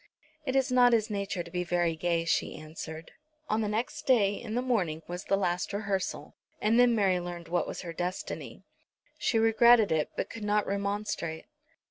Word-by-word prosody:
"It 260 - 0
is 270 -1 +2
not 245 -1 +5
his 220 -1 +2
nature 200 -3 -2
to 170 - -13
be 180 0 -1
very 175 -1 +1
gay," 165 0 0
she 170 - 0
answered. 160 +1 -8 0.4
On 220 -2 +1
the 215 - 0
next 220 +4 -3
day, 210 -7 +4
in 220 +1 -6
the 245 - +1
morning, 180 -11 0
was 180 +2 -6
the 195 - +2
last 180 -1 -1
rehearsal, 200 -2 -3 0.3
and 220 +3 +3
then 245 -1 +5
Mary 190 -4 +2
learned 175 -1 -7
what 175 +1 0
was - - -5
her 170 -2 -6
destiny. 180 +2 -5 0.6
She 230 - +1
regretted 225 -1 +5
it, 155 -1 +1
but - - -2
could 225 - -8
not 210 0 +1
remonstrate. 200 -5 -3
200 Hz, 185 wpm, -29 LUFS, 175-225 Hz, 0.6 s, not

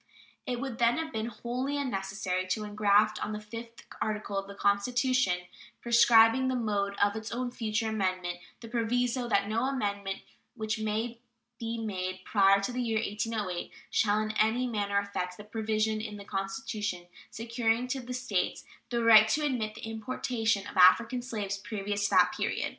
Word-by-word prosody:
It 245 -1 -2
would, 250 -3 -5
then, 235 0 +4
have 320 -1 -3
been 220 0 -2
wholly 250 +4 -3
unnecessary 195 -7 -2
to 215 +4 -1
ingraft 210 0 +2
on 215 - -3
the 210 - -4
fifth 230 +2 -9 0.2
article 210 -1 -2
of 195 0 -2
the 200 - -9
Constitution, 245 -1 +2 0.4
prescribing 235 +1 +5
the 260 - 0
mode 205 -4 -1
of 205 +1 +2
its 220 0 -5
own 245 +1 -2
future 220 -2 -1
amendment, 185 -4 -1 0.2
the 230 - -8
proviso 240 +1 0
"that 200 -2 +2
no 225 +4 0
amendment 200 -7 -2 0.3
which 220 -1 -2
may 220 +2 -2 0.4
be 230 -1 -3
made 185 -4 -4
prior 195 -1 +5
to 200 - -2
the 250 +1 -2
year 225 -2 0
1808 210 -4 -3 0.2
shall 210 -1 +2
in 215 0 -1
any 225 +4 +2
manner 205 -4 -1
affect" 185 -3 -2
the 210 - -9
provision 215 0 -1
in 210 -1 -6
the 200 - -10
Constitution 195 -2 -3 0.2
securing 230 +1 -1
to 270 0 -1
the 250 0 -6
States 245 -8 -1 0.3
the 235 -1 0
right 220 -1 +8
to 300 +8 +1
admit 225 -6 -1
the - - -10
importation 225 -1 -1
of - - -8
African 230 +7 +6
slaves 210 -5 -4
previous 205 -1 -3
to - - +1
that - - +5
period. - - -1
220 Hz, 170 wpm, -29 LUFS, 200-235 Hz, 0.4 s, right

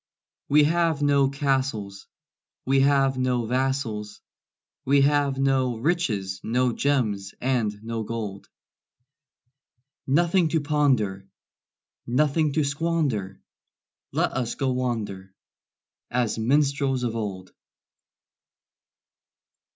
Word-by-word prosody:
We 150 +1 +6
have 165 -1 +1
no 140 -2 +3
castles, 130 -8 -2 0.6
We 135 +1 +3
have 135 -1 +3
no 125 -2 0
vassals, 120 -4 -2 0.6
We 140 +1 +3
have 140 -1 +2
no 135 -3 +1
riches, 110 - -1
no 125 +1 +1
gems 110 -10 -1
and 125 -5 0
no 115 0 -3
gold; 105 -3 -5 1.6
Nothing 170 +5 +3
to 160 0 0
ponder, 130 -10 +1 0.8
Nothing 150 +4 +2
to 155 - +2
squander 145 - -1 0.7
Let - - 0
us 125 -3 -2
go 135 -2 0
wander 110 -7 -3 0.7
As 120 -2 -1
minstrels 135 +1 +1
of 115 -2 -2
old. 95 -4 -5
130 Hz, 95 wpm, -25 LUFS, 110-145 Hz, 1.6 s, We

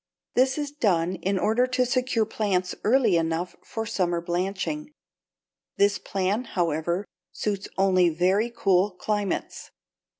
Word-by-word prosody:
This 260 +2 +3
is 290 -1 -3
done 185 - +1
in 195 +1 -1
order 225 +6 +2
to 255 0 +1
secure 250 -3 +1
plants 195 -4 -1
early 225 -5 +4
enough 165 +2 -1
for 225 0 -4
summer 180 -6 0
blanching. 195 - -2 0.9
This 200 0 +3
plan, 200 +5 -1
however, 170 0 -1 0.3
suits 205 -1 -3
only 185 -2 +4
very 185 +7 +2
cool 195 -4 +2
climates. 205 +1 -3
200 Hz, 125 wpm, -26 LUFS, 180-230 Hz, 0.9 s, early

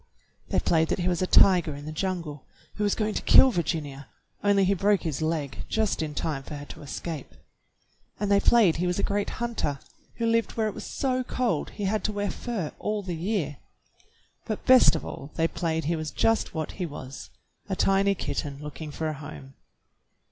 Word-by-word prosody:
They - - +1
played 160 -1 +2
that - - 0
he 180 - -1
was 175 -1 0
a 185 - +1
tiger 175 -7 +5
in 145 +1 -9
a - - -4
jungle, 160 -4 -4 0.3
who 210 - -3
was 205 - +2
going 215 -1 -1
to - - -2
kill 265 - +7
Virginia, 150 - -3 0.4
only 200 -1 +4
he 195 - +3
broke 200 0 +2
his 160 -3 -2
leg 155 -4 -2
just 220 -5 0
in 150 -2 -4
time 145 -3 -2
for 150 - -8
her 145 0 -7
to - - -9
escape; 150 +1 -6 0.8
and 205 -1 -1
they 200 - +6
played 205 -7 +5
he 180 +2 0
was 180 - 0
a - - -1
great 205 0 0
hunter 230 -12 -1 0.4
who 230 - -2
lived 230 0 +1
where 220 -1 0
it 210 - -3
was - - -7
so 255 -1 -1
cold 240 -11 -1
he 205 - -7
had 215 +2 0
to - - +1
wear 205 -1 -2
fur 215 -11 -4
all 210 -1 -2
the 180 -3 -4
year; 165 - -2 0.9
but 215 - -4
best 255 -8 +7
of 160 - -4
all 140 - -7
they 165 - +2
played 160 -2 -2
he 170 +3 +1
was 155 -1 -3
just 225 -6 +1
what 155 -1 -2
he 185 - -4
was, 140 -3 -8 0.4
a 190 - 0
tiny 195 +1 +3
kitten 145 -5 -3
looking 150 +1 -7
for 160 +2 -3
a 155 - -1
home. 75 - -10
175 Hz, 205 wpm, -27 LUFS, 150-205 Hz, 0.9 s, kill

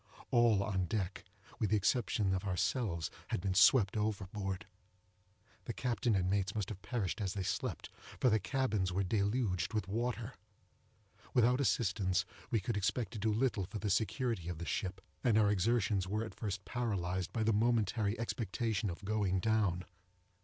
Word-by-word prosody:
All 115 -4 +4
on 95 -3 0
deck, 95 -1 -3 0.3
with 110 - +1
the 110 - +3
exception 105 -2 +1
of 95 - -1
ourselves, 95 - -1 0.2
had - - -1
been 95 +1 -1
swept 100 +1 +6
overboard;—the 100 0 -6
captain 120 -3 0
and 90 -2 +1
mates 100 +1 0
must 105 -3 -2
have 100 -3 -7
perished 115 -4 -2
as 95 -1 -2
they 100 - -1
slept, - - -3 0.3
for 125 - +4
the 110 - +4
cabins 105 -5 0
were 95 +2 0
deluged 100 -1 0
with 105 -4 -1
water. 120 +3 -2 1.0
Without 125 +2 +4
assistance, 95 -7 +1 0.2
we 115 - +2
could 105 +3 -2
expect 105 +1 0
to 110 - -5
do 110 +2 +1
little 105 -4 +1
for 105 - -6
the 105 0 -1
security 110 - 0
of 90 - -4
the 85 - -5
ship, 95 +1 -2 0.2
and 120 -5 +4
our 105 -2 +5
exertions 105 -1 +1
were 105 +3 -1
at 110 - -8
first 100 -4 -4
paralyzed 95 -7 -2
by 110 - -1
the 110 +1 +3
momentary 110 -1 +1
expectation 115 -3 -1
of 90 +3 -7
going 100 -3 +1
down. 100 -4 +1
105 Hz, 165 wpm, -34 LUFS, 95-115 Hz, 1.0 s, swept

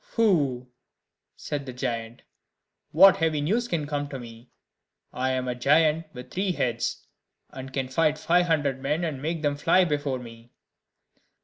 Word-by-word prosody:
"Pooh!" 145 - +2 0.7
said 140 -2 -5
the 130 - -6
giant, 115 -2 -4 0.7
"what 190 +4 +7
heavy 160 -2 0
news 215 +12 0
can 165 -8 -2
come 145 -1 -3
to 135 - -6
me? 115 0 -12 0.6
I 130 +1 -1
am 130 -1 -1
a 125 - -1
giant 155 +5 +2
with 125 -3 -11
three 190 0 -1
heads, 120 -6 -2 0.5
and 130 0 -8
can 135 -1 -2
fight 155 +3 +1
five 175 +3 +2
hundred 145 -5 0
men, 150 +5 -1
and 150 -6 -3
make 160 +1 -3
them 145 -1 +1
fly 175 +5 +4
before 145 -4 -1
me." 115 -1 -12
145 Hz, 155 wpm, -26 LUFS, 130-165 Hz, 0.7 s, what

